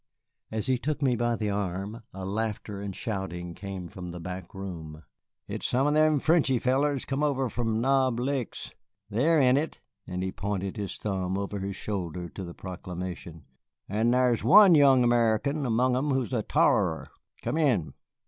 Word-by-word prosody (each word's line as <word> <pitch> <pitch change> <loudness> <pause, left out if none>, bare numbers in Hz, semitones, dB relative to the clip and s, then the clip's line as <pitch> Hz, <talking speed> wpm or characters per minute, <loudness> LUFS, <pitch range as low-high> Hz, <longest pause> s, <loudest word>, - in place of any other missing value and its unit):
As 110 -1 -3
he 130 -2 +1
took 150 +2 -2
me 130 -3 +3
by 120 0 +1
the 105 -2 -2
arm, 100 +3 -3
a 95 0 -7
laughter 105 0 -3
and 100 -2 -5
shouting 90 -6 -4
came 95 -1 -6
from 90 -2 -8
the 85 0 -7
back 90 +1 -7
room. 80 -5 -7 0.4
"It's - - -3
some 130 +3 +1
of 150 - +2
them 155 -1 +4
Frenchy 155 -4 +3
fellers 135 +3 +1
come 135 +1 -2
over 135 -4 +1
from 115 -1 -1
Knob 130 -2 +2
Licks. 130 -1 -3 0.4
They're 150 +10 +3
in 130 -1 +5
it," 155 +3 -2 0.3
and 90 0 -3
he 95 - -2
pointed 100 0 -3
his 100 -3 -4
thumb 95 -2 -2
over 100 0 -3
his 95 0 -4
shoulder 90 -5 -4
to 95 - -7
the 85 -1 -8
proclamation, 90 -3 -7 0.4
"and 110 +4 +1
thar's 125 -2 +2
one 200 -3 +8
young 135 -4 +6
American 120 +4 +2
among 125 +2 +2
'em 140 +4 0
who's 130 -2 0
a 115 - +1
t'arer. - - +2 0.4
Come 160 - -1
in." 125 - +1
110 Hz, 175 wpm, -28 LUFS, 95-130 Hz, 0.4 s, one